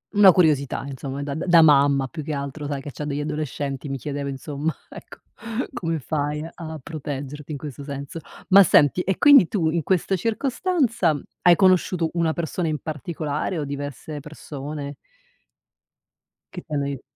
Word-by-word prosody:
Una 200 -2 +9
curiosità 150 -8 +2
insomma, 140 +1 -5
da 140 -1 -4
da 170 +2 +4
mamma 140 -2 +4
più 155 +2 -7
che 150 +1 -4
altro, 140 +1 -4
sai, 140 -2 -3
che 145 - -7
c'ha 150 - -7
degli 145 -1 -3
adolescenti, 145 -2 -4
mi 135 - -2
chiedevo 140 +1 -4
insomma, 145 +3 -3 0.2
ecco - - -12 0.5
come 165 -9 -2
fai 150 +2 -2
a 160 -2 -7
proteggerti 145 -1 -6
in 145 - -3
questo 140 -1 -8
senso? 140 +4 -6 0.3
Ma 195 +1 +9
senti 155 -2 +5
e 190 +1 -1
quindi 285 - +7
tu 160 -5 0
in 170 0 0
questa 190 +3 +1
circostanza, 230 - 0 0.2
hai 175 -1 +7
conosciuto 185 -3 +3
una 165 -2 +1
persona 170 +1 -2
in 155 -1 -1
particolare 155 +2 -3
o 150 - -2
diverse 145 +1 -6
persone? 145 -1 -7 1.6
Che 180 - -6
t'hanno 145 -4 -3
aiu 140 -2 -4
150 Hz, 155 wpm, -23 LUFS, 140-170 Hz, 1.6 s, Una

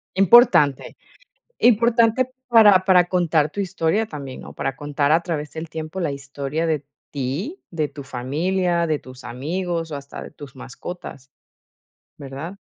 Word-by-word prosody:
Importante, 195 - +5 0.6
importante 235 +2 +3 0.2
para 210 -5 +7
para 180 -2 +5
contar 170 -4 +1
tu 205 - -7
historia 190 +2 0
también, 140 -8 -8
¿no?, - - -11
para 135 - -3
contar, 145 0 -1
a 165 - +3
través 150 -4 -4
del 160 0 -6
tiempo 160 +3 -6
la 160 - -1
historia 140 +3 -4
de 155 -3 -1 0.3
ti, 145 - -4
de 155 -3 -1
tu 140 0 -10
familia, 170 +8 -1
de 155 -3 -1
tus 130 0 -13
amigos, 165 +7 -3
o - - -3
hasta 140 0 -8
de - - -9
tus 145 -3 -12
mascotas, 135 +1 -9 0.9
¿verdad? 140 +7 -8
160 Hz, 145 wpm, -22 LUFS, 140-185 Hz, 0.9 s, para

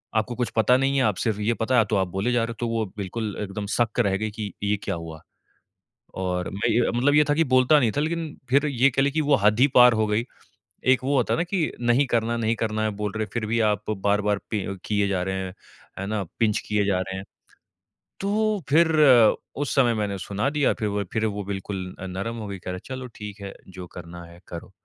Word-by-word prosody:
आपको 110 +2 0
कुछ 125 -1 -1
पता 115 +2 +4
नहीं 135 +1 +1
है 135 - +3
आप 105 -4 +2
सिर्फ़ 110 -3 -1
ये 110 +3 +1
पता 120 +3 0
है 115 - +5
तो 110 - -1
आप 95 -1 +1
बोले 95 +7 -1
जा 120 -1 +2
रहे 115 - -3
हो। - - -8
तो 120 - -1
वो 115 -1 0
बिल्कुल 105 +2 -4
एकदम 105 0 -4
सक 115 -1 0
रह 95 -1 +2
गयी 110 +1 -3
कि, 105 -1 -5
ये 100 +1 +2
क्या - - -2
हुआ? 80 -1 -8 1.0
और 90 -1 -2
मैं 100 - -1
ये 120 0 +2
मतलब 135 +4 +2
ये 150 0 +6
था - - +4
कि 165 +2 +3
बोलता 130 +4 +6
नहीं 120 -4 +2
था, - - +2
लेकिन 160 0 -3
फिर 140 +3 +4
ये 135 -1 +3
कह 135 +1 +1
लें 140 0 +1
कि 155 - 0
वो 145 -1 +3
हद 105 +2 +4
ही 135 - +7
पार 125 0 +8
हो 110 - +2
गयी। 105 +2 0 0.7
एक 130 0 0
वो 140 +2 +1
होता 125 - +2
है - - -1
ना 165 - +1
कि 175 -3 -1
नहीं 120 +4 +3
करना 115 -2 0
है, 120 - -1
नहीं 115 0 +1
करना 110 0 -1
है, 110 - +1
बोल 105 0 -4
रहे 110 - 0
हैं, - - -13
फिर 115 -2 -1
भी 115 +2 0
आप 105 +1 -3
बार-बार 105 0 +1
पि 105 -4 -1 0.2
किए 100 -1 +1
जा 95 -2 0
रहे 95 +1 -2
हैं, 90 -1 -7 0.4
है 95 - -4
ना? 105 0 -1 0.2
पिंच 110 -3 +2
किए 105 -1 +1
जा 95 -2 +1
रहे 95 0 -4
हैं। 95 - -6 1.0
तो 210 0 0
फिर 160 +3 +4 0.7
उस 145 - -3
समय 125 -4 +4
मैंने 105 -3 -2
सुना 100 +5 -2
दिया 145 -1 +2
फिर 110 - 0
वो 100 0 -1
फिर 110 0 0
वो 105 -1 -2
बिल्कुल 95 -1 -5
नरम 100 +6 -4
हो 110 -2 -6
गयी। 100 -1 -6
कह 90 - -6
रहे - - -4
है 130 +8 -7
चलो 130 0 -6
ठीक 105 -1 -8
है 100 0 -6 0.2
जो 90 -1 -7
करना 85 0 -9
है 85 +1 -15
करो। 85 +2 -8
110 Hz, 255 wpm, -24 LUFS, 100-125 Hz, 1.0 s, पार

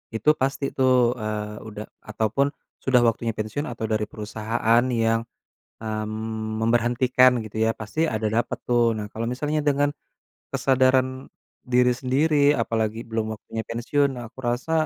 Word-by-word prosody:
itu 115 - +2
pasti 135 +1 0
tuh, 130 -2 +3
eee, 105 0 -4
udah 105 -1 -7 0.2
ataupun 110 +5 0 0.3
sudah 130 -2 +3
waktunya 115 0 -1
pensiun 110 +8 -3
atau 115 -2 -6
dari 110 -1 0
perusahaan 110 +2 0
yang, 115 -2 +2 0.6
mmm, 110 0 -4
memberhentikan 120 +2 +4
gitu 110 0 -8
ya, 115 - 0
pasti 155 +10 -1
ada 110 0 -2 0.2
dapet - - -6
tuh. 120 -2 +2
Nah 105 - -4
kalo 115 - -4
misalnya 150 +5 -1
dengan, 145 0 +2 0.6
kesadaran 130 0 +2 0.4
diri 125 0 +5
sendiri 145 +3 +2
apalagi 115 0 -1
belum 110 -1 -3
waktunya 110 +1 -6
pensiun, 140 +5 +1
nah 120 - -6
aku - - -37
rasa, 120 +6 -1
115 Hz, 140 wpm, -24 LUFS, 110-130 Hz, 0.6 s, diri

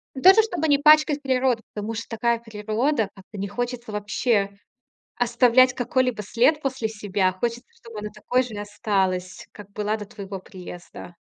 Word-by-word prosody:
Даже, 380 +11 +7
чтобы 320 -8 -2
не 285 -1 +5
пачкать 300 0 +5
природу. 255 -4 +1
Потому 210 +2 -4
что 230 - -5
такая 235 0 0
природа. 220 +2 -1
Как-то 200 +2 -13
не 200 - -3
хочется 240 +1 -4
вообще 205 -1 0 0.6
оставлять 245 +1 +4
какой-либо 250 -2 0
след 245 +9 +2
после 260 -5 -2
себя. 205 -3 0
Хочется, 235 +6 -3
чтобы 230 -2 -10
она 210 0 -5
такой 250 +4 0
же 235 -4 -8
осталась, 190 -3 -2
как 205 -1 -12
была 210 +1 -1
до 210 -1 -7
твоего 200 -3 -8
приезда. 180 -2 -11
225 Hz, 155 wpm, -24 LUFS, 205-255 Hz, 0.6 s, Даже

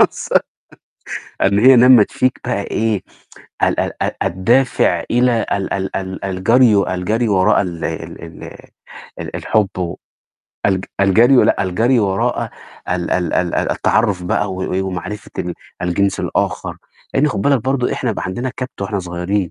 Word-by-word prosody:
وصل - - +3 1.0
إن 100 +1 +3
هي 130 +4 +7
نمّت 125 -3 +6
فيك 130 -1 0
بقى - - -1
إيه 110 -3 -1 0.6
ال - - +2
ال - - -2
ال - - +1
الدافع 115 +9 +2
إلى 120 -1 +2
ال 100 -1 -1
ال 95 -1 -3
ال 95 0 -5
الجري 110 +5 +3
و 100 - +2
الجري 105 +6 -1
وراء 100 0 +3
ال 85 -4 -5
ال - - -5
ال 80 -1 -12 0.8
ال - - -6
الحُب 105 -3 +1
و 90 -2 -3 0.7
الج 95 -1 +1 0.2
الجري 115 +7 +5
ولأ، - - +4
الجري 115 +7 +2
وراء 95 -2 0 0.4
ال 90 -1 -1
ال 90 -1 0
ال 90 -1 0
التعرّف 100 -6 +1
بقى 95 +2 -1
و 95 0 -4
و 95 +1 -1
ومعرفة 95 +3 -6
ال 90 -1 -3 0.3
الجنس 95 +2 0
الآخَر، - - -2 0.4
لإن 145 +3 +3
خُد 100 - -2
بالك 140 -5 +2
برضه 130 -2 0
إحنا 125 - -1
يبقى 110 - -4
عندنا 120 +8 -3
كَبْت 125 -5 -6
وإحنا 100 +1 -2
صغيّرين. 90 +1 -2
100 Hz, 155 wpm, -18 LUFS, 95-120 Hz, 1.0 s, هي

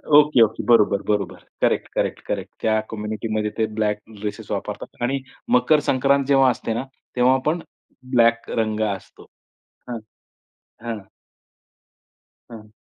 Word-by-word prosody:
Okay, 150 -4 +6
okay. 110 0 -1
बरोबर, 105 -4 +4
बरोबर. 105 -1 -2 0.2
Correct, - - +2
correct, - - -1
correct. - - -3
त्या 110 0 +2
कम्युनिटीमध्ये 110 0 -2
ते 110 - +2
ब्लॅक 105 -1 +1 0.2
ड्रेसेस 105 0 -5
वापरतात. - - -4
आणि 135 +3 0 0.4
मकर 135 +5 +4
संक्रांत 140 +1 +3
जेव्हा 135 -2 +5
असते 115 -1 -3
ना, 115 - -2 0.3
तेव्हा 130 +1 +4
पण 165 +3 +1 0.6
ब्लॅक 115 -1 +4
रंग 110 -1 -1 0.2
असतो. - - -14 0.7
हां, 120 -2 -3 0.8
हां. 115 -2 -3 1.5
हां. 110 -2 -11
115 Hz, 125 wpm, -22 LUFS, 110-130 Hz, 1.5 s, Okay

